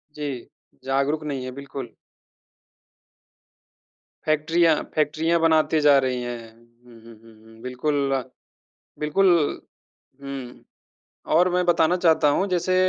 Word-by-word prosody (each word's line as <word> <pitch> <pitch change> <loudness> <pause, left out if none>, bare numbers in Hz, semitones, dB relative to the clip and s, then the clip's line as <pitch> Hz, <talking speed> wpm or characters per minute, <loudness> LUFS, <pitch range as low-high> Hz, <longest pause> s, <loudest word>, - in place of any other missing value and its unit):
जी। 140 -5 -5 0.4
जागरूक 140 +3 0
नहीं 135 -3 -4
है, 130 - -5
बिल्कुल। 135 -2 -8 2.4
फैक्ट्रियाँ 160 +1 +3 0.2
फैक्ट्रियाँ 155 +2 +1
बनाते 160 -1 +3
जा 145 -1 +6
रही 125 -1 -2
है। 120 -1 -4
हुँ, 120 +1 -22
हुँ, 115 0 -13
हुँ, 115 -1 -17 0.2
हुँ 115 0 -17
बिल्कुल, 135 +1 -1 0.8
बिल्कुल। 180 +6 +2 0.9
हुँ 135 -3 -8 0.7
और 180 +2 +4
मैं 180 0 +2
बताना 175 0 +3
चाहता 160 -4 +3
हूँ 195 +7 +1
जैसे 185 0 0
145 Hz, 110 wpm, -23 LUFS, 125-160 Hz, 2.4 s, जा